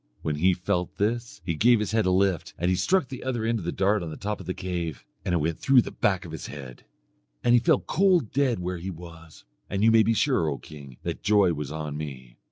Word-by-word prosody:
When 75 -1 -1
he 90 +4 +3
felt 90 0 -2
this 115 +2 -2
he 85 - 0
gave 115 +8 +4
his 105 - -2
head 110 -3 +2
a - - +4
lift, 95 -1 +1
and 85 - 0
he - - +3
struck 160 - +2
the 130 -1 -7
other 120 -4 -2
end 115 0 +1
of 90 - -7
the 85 - -1
dart 100 +2 +1
on 85 - -5
the 80 - -7
top 105 +1 -3
of - - -10
the 90 - -1
cave, 85 -5 -4 0.2
and 90 - 0
it - - +3
went 80 0 -1
through 135 - +1
to 125 - +9
the - - -7
back 95 -3 0
of 85 - -9
his 80 - -6
head. 65 -4 -10 0.6
And 120 - +4
he 120 - +7
fell 120 - +3
cold 180 - +2
dead 135 -4 +1
where 90 0 -4
he 90 +3 -5
was; 80 -4 -11 0.2
and 100 +1 -1
you 115 - +6
may 115 0 +6
be 115 +1 +2
sure, 125 - +2
O 70 - -3
king, 70 -5 -12
that - - -4
joy 100 -4 +4
was 75 -2 -5
on 75 -1 -4
me. 65 -5 -8
90 Hz, 265 wpm, -26 LUFS, 80-110 Hz, 0.6 s, to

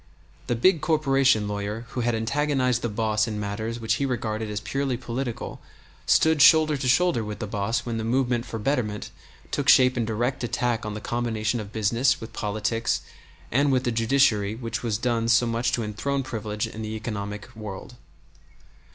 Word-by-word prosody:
The 120 - +1
big 160 +7 +3
corporation 135 -9 +3
lawyer 105 +3 -4
who 125 - -3
had 120 0 +1
antagonized 130 +1 +1
the 120 - -1
boss 110 0 0
in 105 -2 -3
matters 110 +3 -3
which 110 0 0
he - - +2
regarded 110 -3 -2
as 105 0 -3
purely 135 +3 -2
political 120 0 -5 0.5
stood 160 -2 +4
shoulder 155 -1 +7
to 135 -2 -3
shoulder 160 -2 +3
with 105 -1 -5
the 110 - -4
boss 110 +3 -2
when 115 -2 -3
the - - -3
movement 120 0 0
for 115 - -5
betterment 105 -3 -2 0.4
took - - 0
shape 130 0 +6
in 120 - +1
direct 120 +4 -1
attack 120 -2 -1
on 105 - -4
the 105 - -6
combination 115 -1 -1
of 105 -2 -7
business 115 +5 +2
with 115 0 -9
politics 110 +2 -1 0.5
and 140 +3 +3
with 130 -1 +2
the 120 - 0
judiciary 115 -3 +2
which 115 -2 -4
has 115 -3 -1
done 115 -1 0
so 115 +1 +4
much 115 +1 0
to 120 - 0
enthrone 135 +6 -2
privilege 105 -4 -3
in 110 - -7
the 110 0 -4
economic 105 -2 -5
world. 110 +3 -8
115 Hz, 180 wpm, -25 LUFS, 110-130 Hz, 0.5 s, shoulder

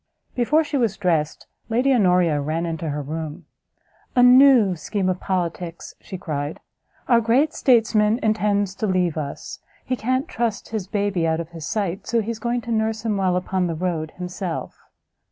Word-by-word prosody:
Before 290 +6 +2
she 290 -1 -2
was 230 -6 0
dressed, 165 -5 0 0.2
Lady 250 +4 +2
Honoria 180 - +3
ran 160 +4 -2
into 165 -1 -3
her 145 0 -3
room, 155 +1 -6 0.7
"A 245 - +5
new 250 -6 +7
scheme 185 +3 -2
of 185 0 -1
politics!" 175 -2 -3
she 190 - -7
cried; 145 -3 -4 0.5
"our 235 -2 +4
great 255 +7 +2
statesman 225 -4 +3
intends 205 -2 +1
to 215 - -1
leave 180 -4 +1
us; 145 -3 -6 0.3
he 255 - -1
can't 255 +5 -1
trust 230 -3 -3
his 215 -4 -4
baby 200 -4 0
out 160 0 0
of 170 -1 -5
his 165 -3 -8
sight, 195 -4 -2
so 235 -2 +1
he 225 +1 -2
is 225 - -6
going 240 +2 -1
to 235 - -6
nurse 220 0 -1
him 215 -2 +1
while 190 -2 +1
upon 180 0 -1
the 165 - -3
road 165 -2 -2
himself. 180 -1 -5
195 Hz, 175 wpm, -22 LUFS, 170-230 Hz, 0.7 s, new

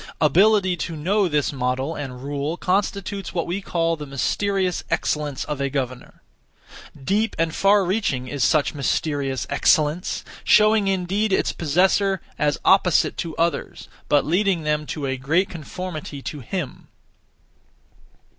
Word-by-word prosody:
Ability 185 +4 +4
to 165 +1 -4
know 190 +6 +1
this 150 -3 0
model 130 +3 -1
and 130 -4 -7
rule 145 +3 -3
constitutes 195 +1 -2
what 170 - 0
we 180 +4 -3
call 165 -3 0
the 150 -2 -8
mysterious 185 +7 -1
excellence 150 -3 -1
(of 150 -2 -4
a 140 - 0
governor). 130 -2 -5 0.8
Deep 210 +7 0
and 165 -1 0
far 200 0 +4
reaching 175 - -1
is 140 -1 -2
such 145 +4 +2
mysterious 140 -2 -1
excellence, 160 +4 +1 0.2
showing 215 -1 +5
indeed 195 +3 0
its - - +1
possessor 190 +4 +2 0.2
as 145 -1 +1
opposite 190 -3 +4
to 165 -2 -4
others, 170 0 -2 0.2
but 145 - +3
leading 180 +1 +1
them 150 0 -1
to 150 -3 -4
a 135 0 -2
great 160 +9 +1
conformity 160 -2 -6
to 150 - -5
him. 140 +3 -5
165 Hz, 135 wpm, -22 LUFS, 145-190 Hz, 0.8 s, showing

